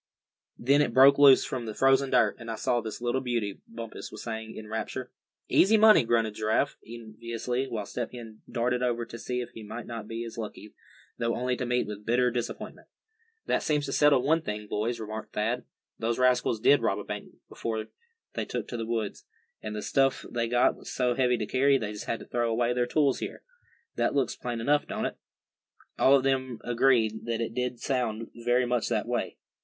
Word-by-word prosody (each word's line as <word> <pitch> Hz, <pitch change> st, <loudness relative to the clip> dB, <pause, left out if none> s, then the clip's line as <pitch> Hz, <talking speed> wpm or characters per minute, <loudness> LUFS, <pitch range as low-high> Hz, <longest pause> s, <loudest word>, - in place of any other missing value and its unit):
Then 140 Hz, +4 st, +3 dB
it 115 Hz, -, 0 dB
broke 140 Hz, +2 st, +7 dB
loose 140 Hz, -2 st, +8 dB
from 125 Hz, -3 st, -4 dB
the 110 Hz, -, -5 dB
frozen 135 Hz, 0 st, +4 dB
dirt, 110 Hz, -5 st, +3 dB
and 115 Hz, -1 st, -8 dB
I 115 Hz, -, -2 dB
saw 120 Hz, +2 st, 0 dB
this 110 Hz, +1 st, -6 dB
little 120 Hz, +2 st, 0 dB
beauty," 115 Hz, -6 st, -2 dB
Bumpus 115 Hz, -1 st, -8 dB
was 110 Hz, -, -8 dB
saying, 110 Hz, -1 st, -5 dB
in 110 Hz, -, -8 dB
rapture. 110 Hz, +3 st, -4 dB, 0.4 s
"Easy 215 Hz, +4 st, +5 dB
money!" 215 Hz, -, +7 dB
grunted 115 Hz, -2 st, +1 dB
Giraffe, 110 Hz, +1 st, 0 dB
enviously; 115 Hz, +3 st, -4 dB
while 110 Hz, -5 st, -4 dB
Step 120 Hz, +3 st, -4 dB
Hen 115 Hz, -3 st, -10 dB
darted 125 Hz, +1 st, 0 dB
over 120 Hz, -1 st, 0 dB
to 115 Hz, 0 st, -9 dB
see 125 Hz, +1 st, -2 dB
if 120 Hz, -, -7 dB
he 115 Hz, -, -10 dB
might 110 Hz, +3 st, -7 dB
not 115 Hz, -3 st, -6 dB
be 115 Hz, +1 st, -4 dB
as 115 Hz, 0 st, -8 dB
lucky, 105 Hz, -1 st, -7 dB, 0.5 s
though 115 Hz, 0 st, 0 dB
only 125 Hz, +1 st, 0 dB
to 125 Hz, 0 st, -3 dB
meet 125 Hz, 0 st, +1 dB
with 105 Hz, 0 st, -7 dB
bitter 125 Hz, +3 st, +2 dB
disappointment. 120 Hz, -1 st, -5 dB, 0.6 s
"That -, -, +1 dB
seems 150 Hz, -2 st, 0 dB
to 135 Hz, -, -4 dB
settle 145 Hz, -4 st, +4 dB
one 160 Hz, +4 st, +3 dB
thing, 105 Hz, -5 st, -5 dB
boys," 110 Hz, +3 st, -2 dB
remarked 110 Hz, 0 st, -6 dB
Thad. 115 Hz, +4 st, -1 dB, 0.3 s
"Those 115 Hz, +1 st, 0 dB
rascals 125 Hz, -3 st, +2 dB
did 140 Hz, +5 st, +5 dB
rob -, -, +1 dB
a -, -, -5 dB
bank -, -, -7 dB
before 110 Hz, -1 st, -4 dB, 0.5 s
they -, -, -2 dB
took -, -, -4 dB
to 120 Hz, -, -4 dB
the 115 Hz, -1 st, -4 dB
woods. 115 Hz, -3 st, -3 dB, 0.4 s
And 105 Hz, 0 st, -5 dB
the 105 Hz, -, -4 dB
stuff 135 Hz, -1 st, +1 dB
they 115 Hz, -1 st, -1 dB
got 120 Hz, +1 st, +3 dB
was -, -, -9 dB
so 125 Hz, -1 st, +1 dB
heavy 125 Hz, -1 st, +2 dB
to 110 Hz, -, -2 dB
carry, 135 Hz, +4 st, +3 dB
they 105 Hz, -4 st, -4 dB
just 105 Hz, -, -7 dB
had 115 Hz, -, -3 dB
to -, -, -9 dB
throw 120 Hz, -1 st, -1 dB
away 120 Hz, +1 st, +1 dB
their 120 Hz, 0 st, 0 dB
tools 140 Hz, 0 st, +2 dB
here. -, -, -6 dB, 0.5 s
That -, -, +1 dB
looks 135 Hz, -2 st, +1 dB
plain 120 Hz, -2 st, -4 dB
enough, 145 Hz, +5 st, +2 dB
don't -, -, -3 dB
it?" -, -, -4 dB, 0.8 s
All 135 Hz, -, +6 dB
of 135 Hz, -, +2 dB
them 130 Hz, -3 st, 0 dB
agreed 120 Hz, -3 st, +2 dB
that 115 Hz, -1 st, -2 dB
it 115 Hz, -1 st, -3 dB
did 125 Hz, 0 st, -2 dB
sound 115 Hz, -4 st, -2 dB
very 120 Hz, +1 st, +3 dB
much 120 Hz, -1 st, 0 dB
that -, -, 0 dB
way. -, -, -2 dB
120 Hz, 210 wpm, -28 LUFS, 110-125 Hz, 0.8 s, loose